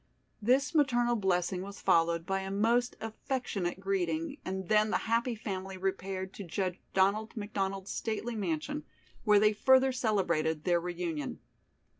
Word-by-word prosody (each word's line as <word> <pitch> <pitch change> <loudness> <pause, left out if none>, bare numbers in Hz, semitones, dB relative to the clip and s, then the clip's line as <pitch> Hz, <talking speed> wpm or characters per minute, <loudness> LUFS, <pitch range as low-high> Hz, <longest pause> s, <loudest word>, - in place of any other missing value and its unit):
This 265 +7 +2
maternal 240 -6 +3
blessing 185 -3 0
was 200 +1 -8
followed 170 0 +2
by 195 +1 0
a 190 0 -5
most 230 +5 +2
affectionate 220 -5 -3
greeting 175 -4 -1
and 190 -1 -4
then 215 +1 +4
the - - +2
happy 230 +1 +1
family 195 -3 -5
repaired 190 0 -3
to 200 - -7
Judge 185 +1 -2 0.2
Donald 210 +4 +2
McDonald's 195 -2 -3
stately 225 +1 -3
mansion 205 - -2 0.4
where 210 -2 +6
they 215 +1 +4
further 260 +4 +5
celebrated 170 -10 0
their 175 -2 +3
reunion. 170 -5 -3
195 Hz, 140 wpm, -31 LUFS, 180-225 Hz, 0.4 s, where